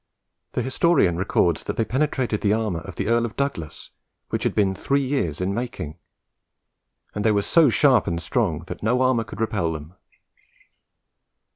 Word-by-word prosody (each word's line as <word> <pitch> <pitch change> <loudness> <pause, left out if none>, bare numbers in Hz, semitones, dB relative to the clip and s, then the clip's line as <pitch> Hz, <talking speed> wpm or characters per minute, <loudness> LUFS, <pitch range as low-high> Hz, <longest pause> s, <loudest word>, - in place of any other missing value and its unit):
The - - -1
historian 130 - +2
records 85 -2 +1
that - - -4
they 115 - +1
penetrated 130 -4 -1
the 105 0 +2
armour 110 -6 -1
of 85 - -9
the - - -2
Earl 115 +1 +3
of 115 -2 -4
Douglas, 140 - -4 0.4
which - - -2
had - - 0
been 100 -2 +2
three 140 +8 0
years 130 - -1
in 95 +2 -1
making; 95 -9 -5 1.1
and 105 - -3
they 110 - +4
were 100 -1 +1
"so 160 +3 +5
sharp 130 0 +4
and 85 0 -1
strong 85 -5 -1
that - - -7
no 125 +4 +2
armour 130 -3 +2
could 115 - -10
repel 100 -7 0
them." 80 +2 -8
110 Hz, 170 wpm, -23 LUFS, 90-130 Hz, 1.1 s, so